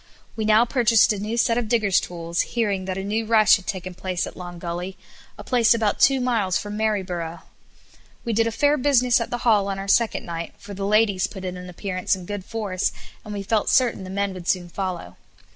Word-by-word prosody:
We 220 - -2
now 215 +2 +5
purchased 230 -3 +4
a 205 - -5
new 215 +3 -3
set 230 0 +2
of 235 - -3
digger's 215 -5 +3
tools, 170 -1 -3
hearing 205 -5 -1
that 185 0 -3
a 190 - -3
new 215 +3 -1
rush 215 -2 +6
had 185 -3 -15
taken 185 -2 -4
place 185 0 -3
at - - -9
Long 175 -1 -8
Gully, 175 +2 -5 0.4
a 205 - -9
place 235 0 +3
about 220 -3 0
two 270 -1 +5
miles 225 -8 +1
from 205 0 -5
Maryborough. 185 -6 -2 0.8
We 230 - -1
did 225 +1 +2
a - - -1
fair 290 +5 +2
business 250 -3 +3
at 230 - -3
the 245 0 -4
hall 210 -4 +4
on 195 -1 -3
our 195 0 -6
second 230 +3 +2
night, 170 0 -6
for 205 - -10
the 195 0 -3
ladies 205 -3 +3
put 190 -2 -9
in 180 0 -4
an 180 0 -8
appearance 185 +1 -2
in 185 -2 -9
good 205 0 -5
force, 205 -3 -2 0.3
and 210 - -9
we 200 -1 -4
felt 215 +1 0
certain 245 -6 +2
the 185 - -8
men 200 0 -1
would 180 -2 -9
soon 175 -2 0
follow. 175 - -5
200 Hz, 225 wpm, -23 LUFS, 185-225 Hz, 0.8 s, rush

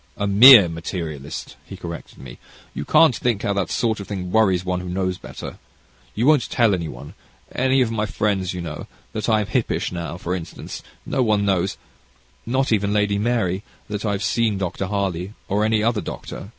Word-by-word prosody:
"A 100 - -1
mere 105 0 +9
materialist," 80 -4 -6
he - - -10
corrected 85 -1 -8
me; 60 -2 -11 0.3
"you - - -5
can't 160 -7 +5
think 115 -5 -1
how 100 - 0
that 100 -4 -1
sort 110 -2 0
of 100 - -7
thing 90 -3 -5
worries 95 -5 +3
one 90 0 -1
who 90 0 -6
knows 95 0 -2
better. - - -9 0.6
You 115 - 0
won't 150 -2 +4
tell 115 -4 +3
any 85 -3 -2
one 70 0 -9 0.4
any 130 +1 +2
of 120 -3 +1
my 110 -1 -1
friends 100 -4 -1
you 90 - -5
know 80 -3 -6 0.3
that 110 +2 -2
I 110 -1 +3
am - - -2
hippish; 120 +3 -1
now, 85 -1 -5
for 90 -1 -3
instance, 90 -3 -6 0.2
no 135 - -1
one 105 -4 +2
knows 95 -1 0 0.7
not 130 +2 0
even 100 -1 +1
Lady 105 -1 +1
Mary 105 -5 0 0.3
that 105 -1 -4
I 105 -2 0
have 100 +1 -3
seen 110 -1 +1
Dr. 95 0 -3
Harley, 95 -1 -2
or 105 +2 +1
any 110 0 +2
other 115 -2 +1
doctor. 100 - -7
100 Hz, 195 wpm, -22 LUFS, 90-110 Hz, 0.7 s, mere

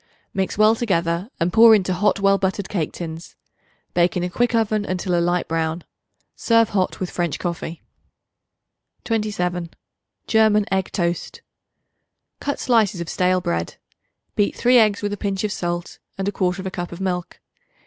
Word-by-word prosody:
Mix 190 0 -2
well 215 +1 +6
together 180 -4 -1
and 170 +2 0
pour 225 0 +8
into 185 -3 0
hot 200 +2 +1
well 195 0 +3
buttered 195 0 -1
cake 170 -7 -2
tins. 165 0 -8 0.6
Bake 175 +1 +2
in 175 - -1
a 180 - -3
quick 240 +5 +1
oven 215 -2 +1
until 185 -2 -2
a 170 - +3
light 175 +1 0
brown. 160 +1 -2 0.5
Serve 230 -1 +3
hot 190 -2 -1
with 185 - -3
French 175 -3 -1
coffee. 170 -2 -5 1.2
27. 180 -6 -2 0.6
German 215 -2 +3
Egg 190 -1 0
Toast. 175 -2 -2 1.0
Cut 285 - -3
slices 220 -7 +2
of 170 -2 -5
stale 185 0 +1
bread; 85 - -2 0.6
beat 205 - +1
3 245 +1 +5
eggs 210 -2 +2
with 205 0 -1
a - - -4
pinch 195 -1 -2
of 210 - -1
salt 175 -1 -4 0.2
and 195 0 -2
1/4 185 0 -2
cup 175 -1 -4
of 170 - -8
milk. 180 -2 -3
190 Hz, 160 wpm, -22 LUFS, 175-210 Hz, 1.2 s, pour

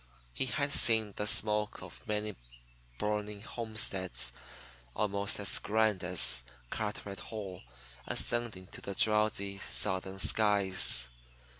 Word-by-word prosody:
He 130 - 0
had 140 +2 -1
seen 110 -3 +6
the 105 - -2
smoke 105 0 +2
of 60 0 -12
many 105 0 -2 0.6
burning 105 +1 -3
homesteads 95 - -2 0.6
almost 100 -1 -1
as 100 0 +1
grand 110 -3 +1
as 90 -9 +2 0.3
Carteret 105 -2 -5
Hall 100 -5 -7 0.5
ascending 115 -6 -1
to - - -10
the 100 - -6
drowsy 105 -2 +1
Southern 95 -1 -1
skies. 95 - +3
105 Hz, 110 wpm, -32 LUFS, 95-110 Hz, 0.6 s, seen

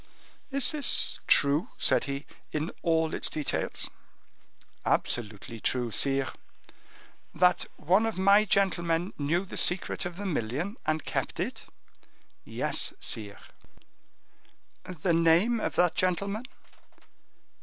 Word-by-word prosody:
"Is 275 0 +3
this 300 -3 +3
true," 145 +3 +4
said - - +2
he, 140 +1 -4 0.3
"in 155 +2 -2
all 160 -1 +1
its - - 0
details?" 150 -2 -2 1.0
"Absolutely 115 0 -1
true, 120 +1 -1
sire." 135 +4 +1 1.0
"That 180 +2 +3
one 190 +8 +2
of 225 - -4
my 200 +2 +5
gentlemen 175 -3 +1
knew 165 +6 0
the - - -7
secret 175 +1 +1
of 175 - -9
the 205 - -5
million, 155 - -2
and 155 0 0
kept - - -3
it?" - - -4 0.8
"Yes, - - -1
sire." 100 -2 -4 1.4
"The 175 -1 -1
name 170 +8 +4
of - - -3
that 175 -1 +3
gentleman?" 200 +5 -1
170 Hz, 110 wpm, -28 LUFS, 145-195 Hz, 1.4 s, my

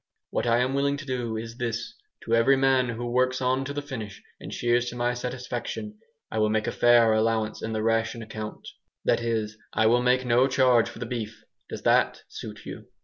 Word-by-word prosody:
What - - -1
I 115 0 +4
am 130 +2 0
willing 140 +1 +1
to 145 - -8
do 120 -4 -2
is 115 +1 -7
this: 115 -1 -3 0.3
to 115 - -2
every 115 +4 +5
man 130 -2 +3
who 120 +1 -4
works 130 +1 +1
on 130 +1 +1
till 140 +1 -5
the 145 - -3
finish 115 -8 -7 0.2
and - - -8
shears 120 0 +1
to 120 - -8
my 120 0 0
satisfaction, 125 - -5 0.3
I - - -1
will 110 0 +3
make 110 0 0
a - - -1
fair 120 -2 +5
allowance 110 0 0
in 110 - -3
the 110 0 -1
ration 115 0 0
account. 110 -1 -7 0.4
That - - +2
is, 110 -2 -2
I 110 - +2
will 120 +2 +4
make 125 +1 +2
no 125 +2 +4
charge 130 -3 +3
for - - -11
the 120 - -4
beef. 115 -2 -5 0.3
Does - - -7
that - - +3
suit - - -9
you?" - - -8
120 Hz, 210 wpm, -26 LUFS, 115-130 Hz, 0.4 s, every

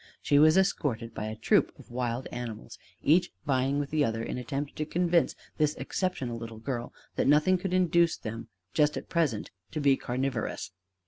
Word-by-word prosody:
She 145 - +3
was 155 +3 +6
escorted 125 -12 +1
by 105 - -4
a 110 - -4
troop - - +3
of - - -15
wild 120 0 -2
animals, 115 -2 -6 0.2
each 175 +4 +4
vying 135 0 +1
with 145 -1 -2
the 155 -1 +3
other 115 -3 -1
in 125 - -3
attempt 140 +4 -4
to 155 - 0
convince 175 0 +2 0.2
this 150 -1 +2
exceptional 130 -11 -2
little 115 -1 -7
girl 120 +1 -4 0.3
that - - +2
nothing 150 +6 +4
could 190 0 -3
induce 170 -2 +3
them 115 +1 -6 0.3
just 150 -1 +3
at - - -7
present 150 -11 0 0.2
to 155 - -4
be 140 -2 +4
carnivorous. 125 -5 -3
140 Hz, 180 wpm, -29 LUFS, 115-155 Hz, 0.3 s, was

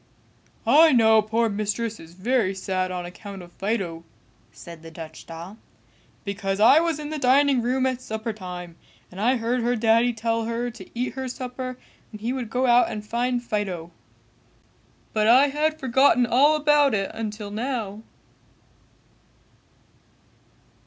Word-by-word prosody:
"I 315 0 +6
know 220 -2 +5
poor 225 +2 0
Mistress 215 +2 -3
is 165 +1 -14
very 205 0 0
sad 185 -1 -2
on 180 -1 -4
account 195 +1 -9
of 175 - -14
Fido," 190 -5 -3 0.5
said 170 -2 -12
the 165 - -10
Dutch 160 -1 -10
doll, 170 +6 -9 0.6
"because 200 -1 -3
I 235 +8 +7
was 330 -2 0
in 300 0 -6
the 310 - -3
dining 270 0 +4
room 255 +2 0
at 255 -1 -1
supper 220 -1 -4
time 180 -4 -8 0.3
and 185 +2 -7
I 250 +4 +3
heard 240 +2 -1
her 240 +1 +1
daddy 230 +1 +3
tell 225 0 -1
her 235 +1 -2
to 235 - -12
eat 250 - -1
her 265 -1 -4
supper 255 0 -6 0.3
and 215 - -9
he 235 +4 -2
would 250 -4 -4
go 255 +2 0
out 245 0 +4
and 210 -2 -6
find 245 +2 -1
Fido; 190 -7 -3 1.2
but 215 -1 +2
I 260 +5 +6
had 310 +2 -1
forgotten 265 -1 +3
all 280 +6 +4
about 295 -4 +3
it 195 -1 -2
until 215 -2 -5
now." 220 -2 -3
230 Hz, 150 wpm, -24 LUFS, 200-255 Hz, 1.2 s, I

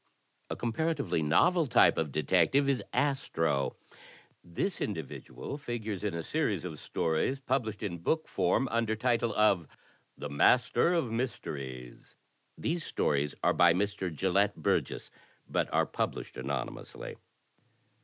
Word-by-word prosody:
A - - -2
comparatively 140 - -1
novel 160 - +3
type 120 - +5
of 80 -3 -1
detective 90 - +3
is 140 -2 +2
Astro. 80 - 0 0.7
This 130 - -3
individual 80 - -5
figures 110 -7 -4
in 105 -5 -1
a 85 - -3
series 105 - -1
of 80 -4 -6
stories 80 +12 0
published 120 -5 -2
in 85 -5 -3
book 160 - 0
form 135 - +1
under 115 -1 +1
title 115 0 +1
of 100 -6 +3 0.5
"The 75 - -5
Master 120 - +3
of 135 -9 0
Mysteries." 70 - -5 0.4
These 165 0 -1
stories 75 - 0
are - - +4
by 85 -1 +5
Mr. 100 -2 -1
Gelett 95 +5 +1
Burgess, 80 - -1 0.4
but - - -1
are - - +3
published - - -3
anonymously. 65 0 -5
105 Hz, 125 wpm, -30 LUFS, 80-125 Hz, 0.7 s, type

